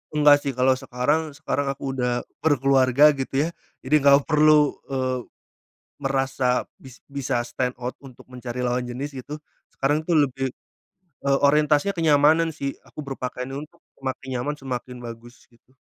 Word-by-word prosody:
Enggak 145 -1 +6
sih, 140 -1 -3
kalau 130 +1 +3
sekarang 145 +4 -1
sekarang 145 -2 -2
aku 135 0 -3
udah 125 -2 -1 0.2
berkeluarga, 135 -1 +4
gitu 135 +2 0
ya. 165 - -1 0.3
Jadi 130 +4 -3
nggak 140 0 +5
perlu, 150 -1 +4 0.2
eee, 130 -2 -1 0.8
merasa 135 -2 0 0.2
bis 130 -2 -13 0.2
bisa 130 -3 -1
stand 125 +1 -3
out 125 +1 -4
untuk 135 -3 -14
mencari 125 0 -5
lawan 125 0 -1
jenis 140 +4 -5
gitu, 135 +3 -7 0.4
sekarang 145 +3 +1
tuh 165 +1 0
lebih, 135 0 -3 0.8
eee, 140 0 +4
orientasinya 150 +5 +3
kenyamanan 160 -1 +3
sih, 140 -2 -3 0.2
aku 150 - -8
berpakaian 130 -1 -5 0.2
untuk - - -30 0.2
semakin 130 0 -5
nyaman, 150 +4 -2
semakin 125 -2 -6
bagus, 120 +1 -10
gitu. 125 +3 -29
135 Hz, 145 wpm, -24 LUFS, 125-145 Hz, 0.8 s, Enggak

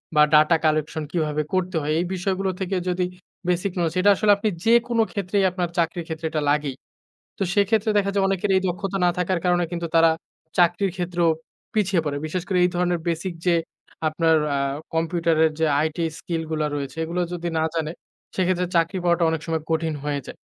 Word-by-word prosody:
বা 150 - +7
data 155 +2 +6
collection 155 0 0
কিভাবে 155 -3 0
করতে 185 -1 0
হয়। 150 +1 -1
এই 175 - 0
বিষয়গুলো 190 +1 -1
থেকে 190 0 -2
যদি 180 0 0 0.4
বেসিক 180 +2 0
নলেজ 165 -2 0
এটা 205 +2 +6
আসলে 210 +1 +3
আপনি 215 +1 0 0.2
যেকোনো 235 0 +4
ক্ষেত্রেই 200 -1 0
আপনার 175 -1 -2
চাকরির 170 0 0
ক্ষেত্রে 160 0 -5
এটা 155 -1 -1
লাগেই। 145 -2 0 0.6
তো - - -1
সেক্ষেত্রে 215 +2 +2
দেখা 200 0 +1
যায় 195 -1 +2
অনেকের 195 +1 0
এই 190 - +2
দক্ষতা 190 +2 -3
না - - +4
থাকার 180 0 0
কারণে 175 -1 +3
কিন্তু 170 -1 -2
তারা, 165 0 +6 0.5
চাকরির 175 +2 +3
ক্ষেত্রেও 175 -2 +1 0.4
পিছিয়ে 195 -4 +2
পড়ে। 145 -1 -2
বিশেষ 175 +3 -3
করে 185 - +1
এই 180 - +3
ধরনের 175 -1 +1
বেসিক 170 +2 -2
যে, 175 - +4 0.5
আপনার 160 +1 +3 0.2
আ - - 0 0.4
কম্পিউটারের 165 -1 +2
যে 160 - +3
আইটি 160 +2 -1
স্কিল 165 -2 -3
গুলা 155 -1 0
রয়েছে 140 -1 -5
এগুলো 170 +2 -2
যদি 175 -1 -3
না 160 - +1
জানে, 160 -1 -1 0.4
সেক্ষেত্রে 180 -1 +1
চাকরি 170 +3 +2
পাওয়াটা 170 -1 +3
অনেক 160 -1 -1
সময় 160 -2 -1
কঠিন 160 -1 0
হয়ে 145 -1 -1
যায়। - - -9
175 Hz, 185 wpm, -23 LUFS, 160-185 Hz, 0.6 s, বা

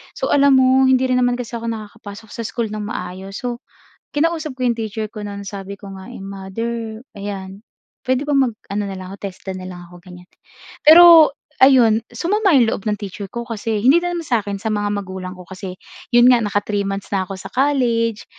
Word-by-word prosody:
So - - -2
alam 280 -1 +5
mo 260 0 +5
hindi 260 0 +4
rin 255 -1 +2
naman 245 -1 +2
kasi 245 -2 -6
ako 230 -1 -5
nakakapasok 215 -1 -8
sa - - -6
school 225 -2 -3
ng 215 0 -4
maayos 190 -1 -6
so, 240 -1 -3 0.5
kinausap 315 0 0
ko 255 - -7
'yong 235 - 0
teacher 220 -1 -4
ko 210 -1 -8
no'n 200 0 -6
sabi 200 0 -7
ko 200 - -10
nga 190 0 -11
eh - - -9
"Mother, 220 +4 -5 0.2
ayan 200 0 -7 0.4
puwede 260 +3 0
bang 290 - +2 0.2
mag-ano 205 -1 -5
na 195 -1 -5
lang 185 - -8
ako 195 - -8
TESDA 190 -1 -7
na 185 - -8
lang 180 -1 -8
ako?" 175 - -14
ganyan. 180 -1 -13 0.6
Pero 330 -1 +9 0.3
ayun 235 -5 +6
sumama 405 +3 +1
'yong 245 -3 +5
loob - - -4
ng 210 - 0
teacher 200 0 -6
ko 235 0 -4
kasi 225 -1 -2
hindi 275 +7 +6
na 350 0 -2
naman 335 -2 -5
sa 240 -6 +1
akin, 200 -1 -4
sa 220 - -3
mga 205 -1 -1
magulang 190 -2 -5
ko 180 - -10
kasi 185 -1 -7 0.4
'yon 240 0 +7
nga 245 -2 +5
naka-3 205 0 -1
months 195 0 -4
na 190 -1 +1
ako 195 0 -6
sa - - -8
college, 240 -5 +1
220 Hz, 210 wpm, -19 LUFS, 195-255 Hz, 0.6 s, Pero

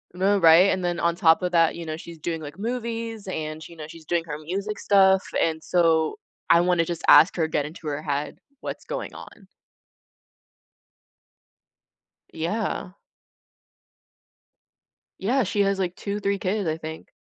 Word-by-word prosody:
No, 195 +2 +2
right, 170 +2 +7
and 185 -2 -1
then 175 -1 -1
on 170 0 +1
top 165 -2 +4
of 180 - -1
that, 165 -1 +4
you 170 - -7
know, 155 0 -4
she's 165 -1 -11
doing, 165 +1 -3
like, 155 +3 -9
movies, 230 -2 -4
and, 155 -3 -5
you 170 - -14
know, 155 -2 -8
she's 160 -1 -13
doing 170 +1 0
her 150 -2 -5
music 195 +7 -4
stuff, 190 -1 +4 0.2
and 160 -1 0
so 165 -3 +2 0.3
I 170 - +6
wanna 175 -1 +2
just 170 -1 -4
ask 155 +5 +7
her, 160 -3 0
get 150 -2 -1
into 155 +1 -9
her 145 0 -3
head, 145 0 -3 0.2
what's - - -6
going - - -5
on. - - -13 2.9
Yeah. 185 +2 -3 2.3
Yeah, 250 +6 +1
she 205 +1 0
has 195 -1 +1
like 180 -1 -2
2, 205 0 -4
3 200 0 0
kids, 195 0 -1
I 155 0 -1
think. 160 0 -8
170 Hz, 160 wpm, -24 LUFS, 160-195 Hz, 2.9 s, right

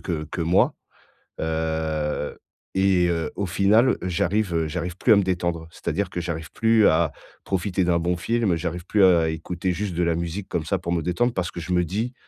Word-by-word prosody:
que 80 -4 -3
que 85 +2 -4
moi. 85 +3 +3 0.7
Heu 80 -1 -2 0.4
et 95 -2 +3
heu, 85 -2 -1
au 100 - -2
final, 105 +8 +3
j'arrive, 95 +1 0
heu, 80 -1 +1
j'arrive 90 +2 -4
plus 115 - +2
à - - +7
me 100 - +3
détendre. 85 -3 -2
C'est-à-dire 85 +4 -2
que 90 - -3
j'arrive 80 -1 -5
plus 115 -2 +3
à 80 -1 +3 0.3
profiter 95 0 0
d'un 85 -1 +2
bon 90 +2 0
film, 110 -1 +1
j'arrive 85 +1 -4
plus 100 0 +3
à 90 -3 +6
à 80 - +1
écouter 85 +3 -3
juste 95 -1 -3
de 90 - +1
la 85 - +2
musique 85 +4 -4
comme 80 - -1
ça 95 +5 0
pour 85 -1 -4
me 85 - 0
détendre. 120 +8 0
Parce 90 -4 -2
que - - -7
je 90 +2 -3
me 90 0 +3
dis, 110 +9 -2
90 Hz, 210 wpm, -24 LUFS, 80-95 Hz, 0.7 s, à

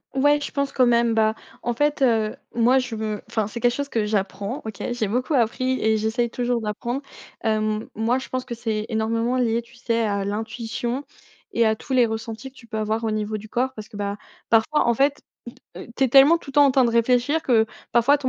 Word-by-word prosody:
Ouais 290 +2 +4
je - - -4
pense 280 -1 -1
quand 255 -2 +3
même, 235 -1 +3
bah, 220 0 +2 0.3
en 240 - -2
fait, 295 +3 +1
heu, 225 -4 +2 0.2
moi 240 +3 +4
je 255 -3 -4
veux 215 -1 -3
enfin, 220 -2 0
c'est 215 +3 -6
quelque 240 0 +2
chose 285 +1 -3
que 220 -5 0
j'apprends 200 +4 -2
OK, 220 -2 -7
j'ai 240 -3 -1
beaucoup 250 +8 0
appris 255 +2 +1
et 220 0 +3
j'essaye 225 +2 0
toujours 245 -1 -1
d'apprendre. 235 +5 -3 0.4
Hem, 215 -1 0
moi 225 +3 +1
je 265 - -6
pense 255 0 -3
que 235 - -6
c'est 220 -2 -3
énormément 230 +2 0
lié 235 -2 +1
tu 235 +2 -20
sais, 230 -1 -1
à 200 -1 -1
l'intuition 225 +4 -3 0.5
et 235 - +3
à 220 - +2
tous 265 - -6
les 250 -2 +5
ressentis 225 +3 -5
que - - -35
tu 235 - -14
peux 225 -1 -5
avoir 215 +1 -1
au 220 - 0
niveau 215 0 -2
du 215 +1 -11
corps. 255 +4 0
Parce 215 -1 -8
que, 210 - -11
bah, 200 0 -3 0.3
parfois, 230 +7 +3
en 235 - +3
fait, 280 +3 +2 0.6
mmh - - -8
heu, - - -10
tu 270 - +3
es - - +2
tellement 275 +6 +7
tout 280 - -10
le - - -15
temps 290 -1 +7
en - - +4
train 260 0 +4
de 235 - +2
réfléchir 250 +6 +2
que, 225 -3 +3 0.3
parfois 240 +5 +5
ton 270 -2 -2
235 Hz, 235 wpm, -23 LUFS, 220-255 Hz, 0.6 s, tellement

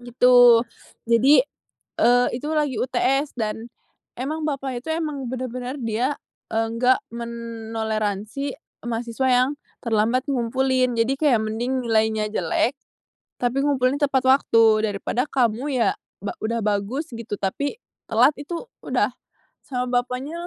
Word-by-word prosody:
gitu. 245 -1 +6 0.5
Jadi, 255 +4 +6 0.6
eee, 245 +1 +5
itu 255 +5 -4
lagi 290 -7 0
UTS 265 +3 0
dan 220 0 -3 0.5
emang 305 +5 -3
bapaknya 270 -3 -3
itu 320 - -7
emang 300 -5 -3
benar-benar 255 0 -4
dia 235 +5 0 0.3
enggak 230 +3 +1
menoleransi 225 +1 -4 0.3
mahasiswa 235 +2 -2
yang 255 +1 +4 0.3
terlambat 230 +3 +2
ngumpulin. 255 0 +1
Jadi 240 +4 +1
kayak 250 -8 +3
mending 240 +4 -2
nilainya 220 -1 +1
jelek, 240 +4 0 0.7
tapi 245 +2 0
ngumpulinnya 280 0 +2
tepat 265 -1 +2
waktu 225 -5 +4
daripada 230 +5 -1
kamu 240 -1 +1
iya 245 - +3 0.3
ba - - -4
udah 230 +1 -1
bagus 210 +10 -1
gitu, 230 -3 -5
tapi 285 - -2 0.3
telat, 245 +6 +5
itu 335 - -5 0.2
udah - - 0 0.5
sama 250 -2 -2 0.2
bapaknya 280 +8 -6
245 Hz, 120 wpm, -23 LUFS, 225-270 Hz, 0.7 s, gitu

